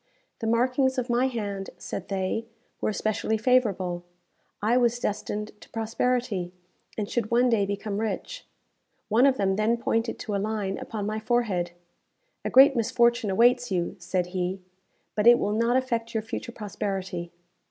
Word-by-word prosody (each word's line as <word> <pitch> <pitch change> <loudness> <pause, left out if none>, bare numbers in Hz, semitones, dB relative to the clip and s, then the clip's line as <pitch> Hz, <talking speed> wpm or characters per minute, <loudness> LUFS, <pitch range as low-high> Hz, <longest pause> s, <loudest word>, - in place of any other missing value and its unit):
The 225 - -3
markings 255 +3 +2
of 250 -1 -1
my 245 +2 +3
hand, 205 -6 -4
said 190 - -6
they, 195 +4 -2 0.3
were - - +1
especially 215 +1 0
favourable. 200 -8 +1 0.6
I 220 +4 +2
was 240 -1 +3
destined 210 -1 -3
to - - -14
prosperity, 225 -4 -1 0.5
and 210 -2 -1
should 230 -1 -1
one 245 +2 +4
day 205 -4 +2
become 200 0 -3
rich. 225 - -4 0.6
One 235 +5 +5
of 265 -1 +2
them 195 -1 +1
then 220 +2 +2
pointed 230 0 -1
to 215 - -5
a 200 - 0
line 205 -2 -2
upon 210 -2 -4
my 215 +1 -2
forehead. 220 -6 0 0.7
"A - - -1
great 270 +2 +7
misfortune 235 0 +2
awaits 245 +5 +4
you," 175 0 -1
said 175 +1 -1
he; 185 +1 -1 0.5
"but 210 +1 +1
it 240 0 +9
will 205 - 0
not 230 +3 +2
affect 235 -3 -2
your 220 - 0
future 225 +2 -5
prosperity." 190 -5 -4
220 Hz, 160 wpm, -26 LUFS, 200-240 Hz, 0.7 s, it